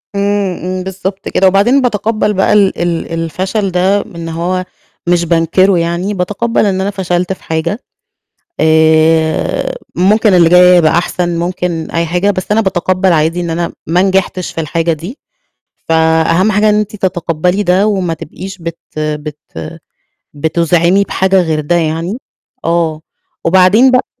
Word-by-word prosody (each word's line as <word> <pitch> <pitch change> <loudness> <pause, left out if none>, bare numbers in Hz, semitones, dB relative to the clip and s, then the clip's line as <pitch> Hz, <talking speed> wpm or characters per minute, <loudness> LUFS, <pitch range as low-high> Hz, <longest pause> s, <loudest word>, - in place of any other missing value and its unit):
إمم، 200 -2 0
إمم 185 0 -3
بالضبط 190 +1 -5
كده، 190 - +2
وبعدين 205 +9 +3
بَاتَقبّل 215 -2 0
بقى 190 +1 +1
ال 200 -4 +2
ال 170 -1 -2
الفشل 185 +5 -2
ده 190 +3 +2
إن 170 -5 -8
هو 180 +3 -2 0.4
مش 175 -1 +2
بانكره 170 +3 +2
يعني، 170 +4 -2
بَاتَقبّل 205 +5 -1
إن 190 -1 0
أنا 200 - -1
فشلت 180 -1 -2
في - - -15
حاجة، 165 +7 -2 0.8
آآ 160 - +2 0.2
ممكن 205 +2 +3
اللي 170 -2 +5
جاي 180 0 +6
يبقى 160 -2 +3
أحسن، 175 0 -1
ممكن 175 -2 -3
أي 170 0 0
حاجة، 180 +5 +1
بس 185 +1 -5
أنا 220 +1 +3
بَاتَقبّل 185 -1 +1
عادي 165 +2 +1
إن 170 - -4
أنا 170 +1 -2
ما 175 +3 +2
نجحتش 190 -1 0
في 165 - -4
الحاجة 165 +2 -1
دي، 175 - -8 0.7
فأهم 160 +4 +2
حاجة 210 +2 +2
إن - - +2
أنتِ 210 0 -3
تَتَقبّلي 180 0 -1
ده، 190 +2 +2
وما 185 -5 0
تبقيش 190 +5 -9
بت 165 0 -6 0.2
بت 150 -1 -4 1.0
بتُزعِمي 170 +5 +1
بحاجة 190 -1 +1
غير 160 -2 -1
ده 150 +4 -1
يعني، 165 +6 -2 0.5
آه، 165 -2 0 0.4
وبعدين 190 +9 +5
بق 255 0 -1
180 Hz, 150 wpm, -13 LUFS, 165-195 Hz, 1.0 s, جاي